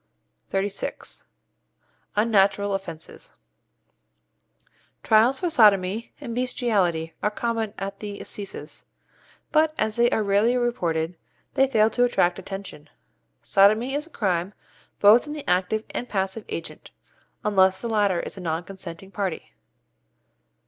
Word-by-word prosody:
XXXVI. 195 +1 -3 0.9
UNNATURAL 205 -2 +3
OFFENCES 190 - -7 1.7
Trials 230 +4 +4
for 350 -2 -1
=sodomy= 205 -2 +4
and 255 -5 -6
=bestiality= 205 - 0
are 210 - +2
common 225 0 -2
at 195 0 -5
the 205 -1 -6
assizes, 195 -7 -6 0.7
but, 310 0 +3
as 215 0 -1
they 240 0 +4
are 220 - +1
rarely 205 +5 +3
reported, 175 -9 -1 0.4
they 270 - +4
fail 220 -4 +3
to 245 - +2
attract 180 -7 +2
attention. 190 -6 -8 0.5
Sodomy 215 +6 +4
is 295 +3 -2
a - - -18
crime 190 - -1 0.4
both 220 +7 +6
in 295 - -5
the 300 -2 -8
active 185 +5 +1
and 245 - -4
passive 195 +2 -2
agent, 165 - -7 0.6
unless 190 -2 +4
the 235 - -4
latter 205 -5 +2
is - - -7
a 190 - -8
non 165 0 -2
consenting 190 0 -10
party. 195 -5 -4
205 Hz, 125 wpm, -24 LUFS, 190-235 Hz, 1.7 s, both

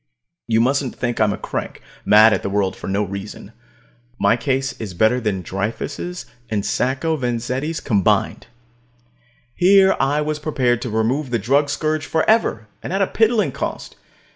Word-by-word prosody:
You 115 0 +2
mustn't 135 +1 0
think 120 -2 -2
I'm 105 -1 +3
a - - -3
crank, - - -5 0.3
mad 110 +1 +7
at 95 - 0
the - - -3
world 100 -1 0
for - - -9
no 100 +2 0
reason. 100 +1 -7 0.7
My 100 +3 +3
case 135 +2 -1
is 100 -5 -6
better 110 +6 +2
than 100 -5 -2
Dreyfus' 115 - -4 0.2
and 105 -2 -2
Sacco 130 +9 0
Vanzetti's 125 +4 -2
combined. 105 -3 0 1.1
Here 190 +3 +5
I 145 +2 +1
was 150 0 -2
prepared 130 -6 0
to 120 - -4
remove 120 +6 0
the 120 - 0
drug 140 +7 +1
scourge 155 +2 -1
forever, 160 - +1
and - - -6
at 195 +1 +1
a - - +3
piddling 225 +2 +1
cost. - - -5
125 Hz, 160 wpm, -20 LUFS, 110-150 Hz, 1.1 s, mad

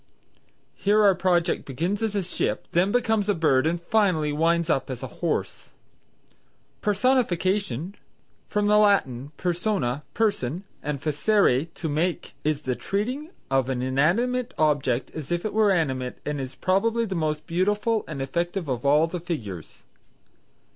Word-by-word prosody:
Here 210 +2 +2
our 200 -2 +6
project 175 -2 +1
begins 170 - -2
as 220 -2 -1
a 200 - 0
ship, 175 - -2
then 180 +4 +2
becomes 220 -3 +1
a 205 - +3
bird 150 -3 +3
and 170 +1 0
finally 170 -5 +1
winds 165 +2 +2
up 135 -5 0
as 130 -2 -5
a - - -9
horse. - - -2 1.1
Personification 195 - +1 0.5
(from 210 0 0
the 210 0 +5
Latin 145 - +2
persona, 175 - -1
person, 195 - 0 0.2
and 150 -1 -3
facere, 150 - +2
to 165 - -4
make) 160 +4 -1
is 150 -1 -1
the 130 -2 -1
treating 250 - -3 0.2
of 135 -1 +2
an 125 -1 -1
inanimate 225 - +1
object 140 -5 +1
as 155 0 -7
if 175 +2 -1
it 215 - -2
were 215 -1 +4
animate 130 -9 0
and 145 -1 -2
is 130 -1 -6
probably 230 +5 +1
the 195 - -4
most 155 -3 -1
beautiful 205 +5 +1
and 140 -4 -4
effective 170 +5 -2
of 125 -3 -2
all 145 +3 +4
the 175 +2 -4
figures. 115 - -6
170 Hz, 150 wpm, -25 LUFS, 145-205 Hz, 1.1 s, our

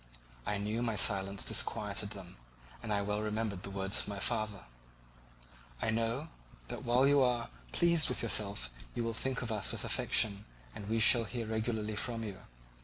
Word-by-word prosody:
I 105 - 0
knew 105 +3 -2
my 115 -2 0
silence 100 -2 +2
disquieted 105 -1 +1
them, 95 - -10 0.4
and 115 - -5
I 100 -1 +1
well 105 +1 -1
remembered 105 -2 -2
the 100 - -6
words 95 0 0
of - - -2
my 100 -1 -4
father: 110 -1 -1 1.1
"I 110 - 0
know 115 +7 -1 0.4
that - - -5
while 125 +3 +4
you 140 0 +5
are 125 -2 +1 0.2
pleased 170 -2 +3
with - - -1
yourself 100 - +1 0.2
you 120 - -1
will 115 0 -2
think 130 +2 -1
of 115 - -4
us 105 -2 0
with - - -3
affection, 100 -1 +2 0.3
and 100 - -8
we 115 +1 +1
shall 115 +1 +7
hear 115 +1 -4
regularly 110 -1 -2
from 115 +1 -2
you. 100 -4 -6
110 Hz, 180 wpm, -33 LUFS, 100-115 Hz, 1.1 s, shall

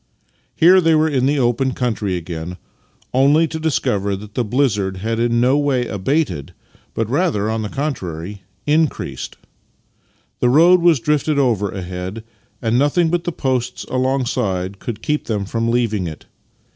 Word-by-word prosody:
Here 185 +3 +6
they 165 -1 +4
were 155 +1 +3
in 135 -4 +1
the 145 +1 +1
open 130 +1 +1
country 110 -7 -1
again 85 +1 -6 0.3
— - - -37
only 145 +5 +4
to 160 0 -5
discover 100 -10 0
that 105 +2 -10
the 125 - 0
blizzard 105 -5 0
had 115 +4 -2
in 120 0 +2
no 130 +4 +3
way 135 -4 +1
abated, 100 - -2 0.4
but 115 - -1
rather, 125 - 0
on 110 0 -1
the 105 - -4
contrary, 100 - -4 0.2
increased. 155 +1 -1 1.0
The 125 - +3
road 170 +7 +6
was 170 -5 +4
drifted 150 +2 0
over 115 -7 +2
ahead, 95 +3 -6 0.4
and 115 +2 +2
nothing 160 +4 +2
but 175 +1 -1
the 175 - -1
posts 130 -6 -2
alongside 115 -8 -1
could 115 -3 -6
keep 150 0 -1
them 105 -3 -2
from 115 +3 -1
leaving 110 -6 0
it. 80 - -9
120 Hz, 160 wpm, -19 LUFS, 100-145 Hz, 1.0 s, Here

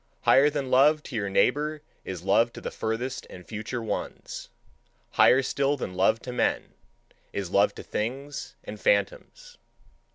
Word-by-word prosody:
Higher 140 +3 +5
than 140 -3 -3
love 150 +4 +5
to 130 - -8
your 100 -2 -1
neighbour 150 +9 +1 0.2
is 90 -3 -6
love 115 +4 +3
to - - -8
the - - -5
furthest 120 +4 -3
and 90 -1 -11
future 115 +2 -5
ones; 110 - -5 0.6
higher 130 +2 +5
still 140 +2 0
than 95 - -5
love 95 +5 +3
to 125 - -6
men, 125 - -1 0.6
is 95 -3 -4
love 100 +1 +3
to - - -8
things 135 +6 -4
and - - -8
phantoms. - - -1
125 Hz, 155 wpm, -27 LUFS, 110-145 Hz, 0.6 s, Higher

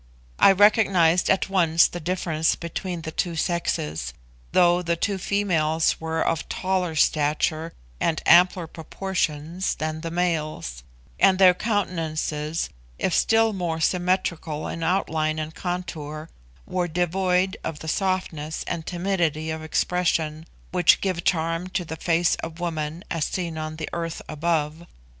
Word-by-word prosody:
I - - +8
recognised 195 -4 +4
at 190 - +2
once 170 -4 +4
the 175 - -7
difference 165 -2 0
between 170 0 -5
the 160 - -5
two 170 +1 -2
sexes, 80 - -2 0.4
though 175 0 +4
the 170 -1 0
two 195 +3 -1
females 165 -6 +1
were 160 0 -1
of 165 -2 -1
taller 185 -3 -1
stature 155 +2 +1 0.3
and 160 - +1
ampler 180 0 +5
proportions 165 0 -3
than 155 0 -3
the 165 - -4
males; 155 - -2 0.4
and 190 -1 +5
their 185 -1 +7
countenances, 165 -6 -2 0.3
if 185 - 0
still 225 0 +3
more 175 -4 -2
symmetrical 170 -3 0
in 165 - -5
outline 160 -3 0
and 155 0 -4
contour, 160 -4 -5 0.3
were 180 -1 -1
devoid 180 +2 +1
of 160 - -4
the 160 - -9
softness 165 -4 -2
and 160 -2 -4
timidity 170 -4 -1
of 160 0 -4
expression 160 -1 0 0.2
which 180 -2 +5
give 185 -3 -1
charm 165 0 0
to 180 -1 -3
the 160 - -5
face 165 +1 +2
of 165 0 -7
woman 160 -1 -3
as 165 -3 0
seen 170 -3 -3
on 155 0 -4
the 155 -1 -5
earth 165 -1 -3
above. 160 +1 -1
165 Hz, 140 wpm, -24 LUFS, 155-180 Hz, 0.4 s, I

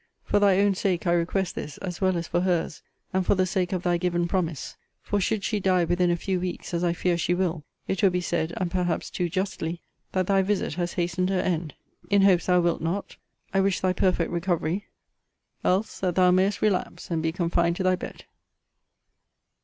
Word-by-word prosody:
For - - +2
thy 200 -2 +4
own 200 0 +4
sake 185 -2 -1
I 170 - +3
request 175 +2 0
this, 150 - -6
as 180 -3 -6
well 185 -2 +2
as 170 0 -3
for 175 - 0
her's, 175 -3 0 0.3
and 190 0 +2
for 180 - +2
the 185 0 +2
sake 185 -1 -1
of 185 -2 -2
thy 175 -1 +2
given 175 -1 0
promise: 170 -5 -2 0.3
for, 205 -1 0
should 210 +1 0
she 210 +1 0
die 185 -2 +3
within 175 +1 +2
a 175 - +2
few 185 +1 -1
weeks, 180 0 -5
as 170 0 0
I 175 - +2
fear 175 0 0
she 175 +1 +1
will, 175 -4 -1 0.2
it 190 - -1
will 195 - +6
be 180 0 0
said, 170 -2 -1
and 180 -1 -1
perhaps 180 -2 -1
too 175 -1 -1
justly, 175 -2 -2 0.3
that 185 -1 +1
thy 195 +1 +3
visit 195 -4 -1
has 175 +1 -2
hastened 175 +1 0
her 190 -1 +1
end. 165 -5 -2 0.3
In 200 -1 +4
hopes 185 -3 +4
thou 180 -1 +4
wilt 170 -1 0
not, 170 +5 -3 0.4
I 195 - +3
wish 195 -1 +1
thy 185 -1 +1
perfect 180 -2 +1
recovery: 175 +2 -1 0.8
else 195 +4 0
that 180 -3 -1
thou 180 -1 +5
mayest 185 +1 +2
relapse, 195 -3 -1
and 165 -1 0
be 160 0 0
confined 170 -1 +1
to 190 - -2
thy 185 0 +3
bed. - - -8
180 Hz, 210 wpm, -26 LUFS, 170-190 Hz, 0.8 s, will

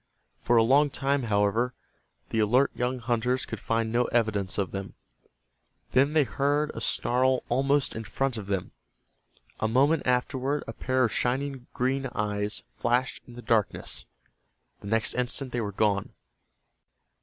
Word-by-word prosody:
For 120 - +2
a 115 - +6
long 140 +5 +4
time, 135 -1 0
however, 105 +5 +1 0.5
the 110 - -1
alert 125 +6 +3
young 125 +1 -1
hunters 125 +2 0
could - - -6
find 115 -1 -1
no 120 +1 +2
evidence 110 -5 0
of 95 -4 -1
them. 95 0 -6 1.0
Then 140 +3 +3
they 155 -2 +5
heard 145 +4 0
a - - -6
snarl 130 +1 +1
almost 135 +3 +2
in 110 - -4
front 135 +3 -1
of 105 -3 -6
them. 95 -2 -2 0.9
A 110 - +1
moment 135 +8 +2
afterward 130 +3 0
a 115 - -5
pair 130 +2 0
of 115 - +2
shining 130 0 -1
green 135 +2 0
eyes 105 0 -2
flashed 125 +2 0
in 120 - -12
the 120 - -9
darkness. 110 -5 0 0.7
The - - -10
next 110 +2 +1
instant 125 +1 -1
they 120 - -1
were 105 -2 -3
gone. 100 -1 +1
125 Hz, 155 wpm, -27 LUFS, 110-135 Hz, 1.0 s, a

